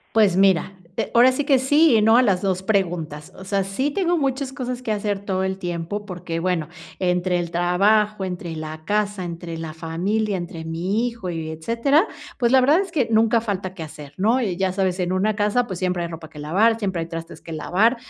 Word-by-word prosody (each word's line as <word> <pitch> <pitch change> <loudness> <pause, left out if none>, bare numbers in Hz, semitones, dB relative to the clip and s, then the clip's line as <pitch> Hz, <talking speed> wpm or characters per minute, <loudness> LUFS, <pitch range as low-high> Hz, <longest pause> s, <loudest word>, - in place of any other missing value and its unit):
Pues 210 -5 +5
mira, 190 0 +3 0.2
eh, - - -1
ahora 245 +2 +7
sí 280 +2 -2
que 275 -2 +5
sí 290 +1 +4
y 215 - +4
no 225 +2 +5
a - - +7
las 195 -7 +2
2 190 -1 -1
preguntas. 175 -7 -1
O 190 - -10
sea, 195 0 0
sí 225 +10 -1
tengo 350 +1 +1
muchas 270 -1 -1
cosas 255 -2 -4
que 230 - -3
hacer 205 -1 -1
todo 190 -1 -1
el 190 0 -2
tiempo 175 +3 -4
porque, 175 -3 -5
bueno, 175 -3 0 0.3
entre 180 0 +1
el 170 -1 -3
trabajo, 195 +4 +2
entre 175 -3 -5
la 155 0 -7
casa, 205 0 -1
entre 170 -1 -6
la 160 -1 -6
familia, 190 +6 -1
entre 175 -2 -6
mi 185 +8 -1
hijo 230 -6 -5
y 160 -2 -4
etcétera, 235 - +1 0.3
pues 240 -2 +2
la 265 - +7
verdad 295 +8 +4
es 385 - -6
que 280 -9 +1
nunca 225 +1 +4
falta 195 -4 -3
que 165 -4 -7
hacer, 150 -2 -10
¿no?, 225 +7 +2
y 190 -7 -1
ya 190 -1 0
sabes, 190 -1 0
en 180 0 0
una 205 +3 +1
casa, 210 +4 +2
pues 185 -6 -6
siempre 180 -1 0
hay 170 - -4
ropa 160 -1 -9
que 150 -1 -12
lavar, 205 +10 +2
siempre 190 -6 -2
hay - - -8
trastes 165 0 -7
que 165 - -8
lavar, 200 +10 +2
190 Hz, 220 wpm, -22 LUFS, 175-225 Hz, 0.3 s, ahora